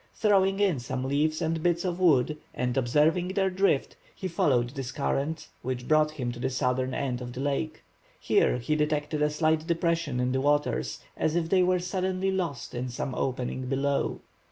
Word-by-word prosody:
Throwing 195 -2 +3
in 190 -9 +2
some 130 +2 -4
leaves 150 +4 0
and 160 0 -1
bits 175 +1 +1
of 180 -1 -2
wood, 150 -4 +3 0.2
and 125 0 -1
observing 150 +8 +2
their 195 -1 +2
drift, 185 -7 +1 0.2
he 190 - -4
followed 125 -8 +1
this 135 -2 -5
current, 150 +2 -2
which 125 -1 -4
brought 155 0 +4
him 130 -6 -4
to 120 - -9
the 125 - 0
southern 130 0 0
end 130 -3 -2
of 120 0 -6
the 125 - -7
lake. 145 +3 -2 0.4
Here - - +2
he 125 +5 -1
detected 150 0 0
a 150 - +3
slight 155 +1 +1
depression 165 -5 0
in 125 0 +1
the 130 0 0
waters, 140 - 0
as 155 - 0
if 165 -1 0
they 185 0 +4
were 180 0 +3
suddenly 185 +1 -1
lost 175 -9 -3
in 125 +1 -3
some 125 +2 -4
opening 130 0 -2
below. 140 +1 0
150 Hz, 185 wpm, -28 LUFS, 130-170 Hz, 0.4 s, brought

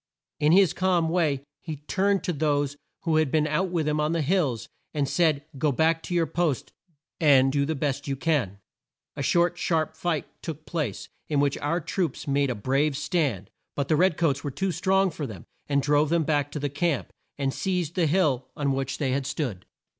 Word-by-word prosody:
In 150 0 +4
his 185 -2 +5
calm 180 -3 +1
way 155 -6 +1 0.2
he 160 -2 -5
turned 190 +7 0
to 180 - -1
those 145 -2 0 0.3
who 165 -2 +2
had 155 -3 +2
been 155 +2 +2
out 155 +5 0
with 165 -4 -1
him 150 0 +1
on 150 +2 +1
the 165 -2 0
hills, 145 - 0 0.3
and 145 -2 +1
said 155 -2 +2
"Go 150 +1 +2
back 160 +4 +2
to 175 - -4
your 170 -1 +3
posts, 160 -6 -1 0.5
and 135 -4 +5
do 140 0 +1
the 160 - -1
best 140 -1 -2
you 135 - -1
can." 135 - 0 0.6
A 145 - -4
short, 175 +5 +2
sharp 160 -2 0
fight 160 -2 -1 0.2
took 155 -2 -6
place, 150 - -3 0.2
in 145 -2 +1
which 140 -1 +2
our 165 +4 0
troops 165 -3 -3
made 140 0 +2
a 125 - -1
brave 135 +6 +1
stand, 145 - -1 0.2
but 140 -1 -2
the 155 - +4
red 175 0 +3
coats 145 -4 +1
were 145 - -2
too 190 +8 -1
strong 190 +3 +2
for 150 -2 -5
them, 100 -7 -9 0.2
and 140 -1 +1
drove 145 +1 +3
them 170 0 +2
back 145 -1 0
to 150 - -3
the 145 - -1
camp, 150 +2 -1 0.2
and 135 -1 -1
seized 180 -4 -1
the 175 -4 +2
hill 145 -7 +1
on 140 -2 0
which 135 0 -2
they 135 -3 0
had 135 0 -1
stood. 125 - -3
150 Hz, 205 wpm, -26 LUFS, 140-170 Hz, 0.6 s, his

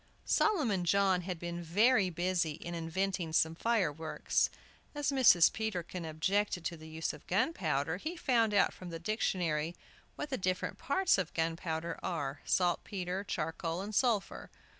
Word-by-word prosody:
Solomon 255 - +2
John 190 +1 +3
had 180 0 -4
been 175 +1 -5
very 200 +4 +3
busy 175 -2 0
in 170 +3 -7
inventing 170 0 -2
some 160 0 +3
fireworks. 165 -6 0 0.5
As 290 -1 0
Mrs. 230 -11 +6
Peterkin 180 -5 -3
objected 175 +3 0
to 170 - -2
the 160 0 -11
use 160 +1 -3
of - - -13
gunpowder, 175 - 0
he 315 - -4
found 235 -8 +2
out 200 - +4
from 185 - -9
the 165 - -5
dictionary 170 -4 -1 0.4
what 295 -1 -5
the 260 - -1
different 185 -1 -2
parts 330 - +2
of 180 -3 -3
gunpowder 165 0 -2
are, 145 -5 -3
saltpetre, 180 +1 0
charcoal, 165 0 -3
and 205 +2 -6
sulphur. 225 -3 0
180 Hz, 145 wpm, -32 LUFS, 165-205 Hz, 0.5 s, Mrs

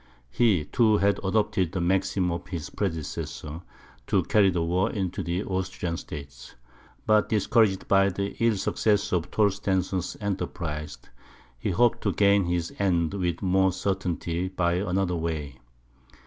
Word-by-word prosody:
He, 95 - +2
too, 110 -3 +3
had 100 0 +2
adopted 95 -3 +1
the 95 - -1
maxim 95 0 +1
of 85 +1 -5
his 85 -5 -5
predecessor, 80 -3 -4 0.5
to - - +2
carry 100 -2 +4
the 85 -2 0
war 90 +3 +1
into 95 -2 -3
the 85 +3 -2
Austrian 95 -2 -3
States. 70 -6 -9 0.5
But 110 -1 +3
discouraged 105 -2 +2
by 100 0 +4
the 100 +2 -3
ill 115 -2 +4
success 105 +1 +1
of 85 -2 0
Torstensohn's 95 -3 0
enterprise, 85 -7 -4 0.6
he 65 - -2
hoped 120 +6 +2
to - - 0
gain 100 -1 +4
his 85 -1 -2
end 85 -4 +1
with 90 -2 -2
more 95 0 +3
certainty 90 -2 -2
by 90 -2 0
another 95 -1 0
way. 80 -5 -4
95 Hz, 140 wpm, -26 LUFS, 85-100 Hz, 0.6 s, carry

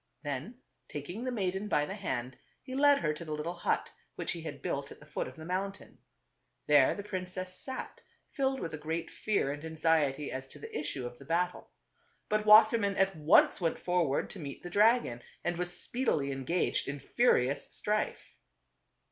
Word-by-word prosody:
Then 145 - -4 0.3
taking 175 - -6
the 255 - -1
maiden 195 -2 -1
by 150 -7 +2
the 190 - -5
hand, 130 - -3 0.3
he 260 - -8
led 285 +1 +5
her 150 - 0
to 150 - -7
the 155 -2 -5
little 150 +3 -3
hut 175 - -1 0.2
which - - -2
he 170 - -4
had 150 -3 -6
built 140 0 -2
at - - -11
the 150 - -15
foot 150 - -3
of - - -10
the 160 -1 -9
mountain. 195 +3 -4 0.7
There 145 -3 +5
the 200 - -6
princess 185 -2 -5
sat, 265 - -6 0.3
filled 270 -1 0
with 165 -6 -4
a 155 - -5
great 160 +2 -3
fear 200 -10 0
and 145 +1 -6
anxiety 160 -3 +1
as 130 0 -5
to 140 - -14
the 145 - -9
issue 145 -4 -3
of 120 0 -8
the 140 - -12
battle. 175 +4 -1 0.6
But 215 0 +1
Wassermann 215 -1 +7
at 195 0 +3
once 155 +4 +5
went 165 -2 +1
forward 175 -6 0
to 195 - -8
meet 140 -4 -7
the 175 - -7
dragon, 210 - +3 0.2
and 175 - 0
was 180 0 -1
speedily 155 - 0
engaged 135 +7 0
in 140 +1 -3
furious 135 - +2
strife. 210 0 -2
170 Hz, 185 wpm, -31 LUFS, 145-200 Hz, 0.7 s, Wassermann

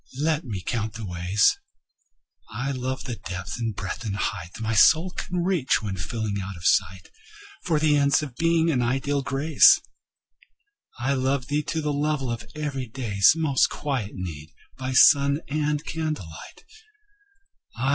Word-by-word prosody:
Let 155 +1 0
me 105 -7 -5
count 110 +2 -3
the 115 -1 -7
ways. 90 +3 +1 0.9
I 125 +5 -3
love 130 0 -4
thee 125 - -5
to - - -11
the - - -9
depth 95 +4 -5
and 115 -3 -2
breadth 95 +6 -5
and 105 -3 -3
height 90 -3 -4
My 115 0 -2
soul 160 +11 +5
can 180 -1 -3
reach, 175 -11 +1
when 100 -3 -3
feeling 105 +3 -3
out 95 -1 -7
of 85 - -11
sight 95 -1 +1 0.5
For 160 - +1
the 150 -1 +3
ends 140 +1 +3
of 135 -5 -7
Being 165 +1 +2
and 130 -5 +1
ideal 135 +4 0
Grace. 140 +4 +5 1.2
I 130 +3 0
love 130 0 -1
thee 145 +1 +1
to 160 - -2
the 150 -1 -1
level 145 -3 -1
of 120 0 -6
everyday's 130 -8 +1
Most 155 -5 +2
quiet 130 -8 -3
need, 80 -5 -7 0.2
by 130 0 -4
sun 140 +3 +5
and 150 +1 -1
candlelight. 150 - -6
130 Hz, 155 wpm, -25 LUFS, 105-150 Hz, 1.2 s, soul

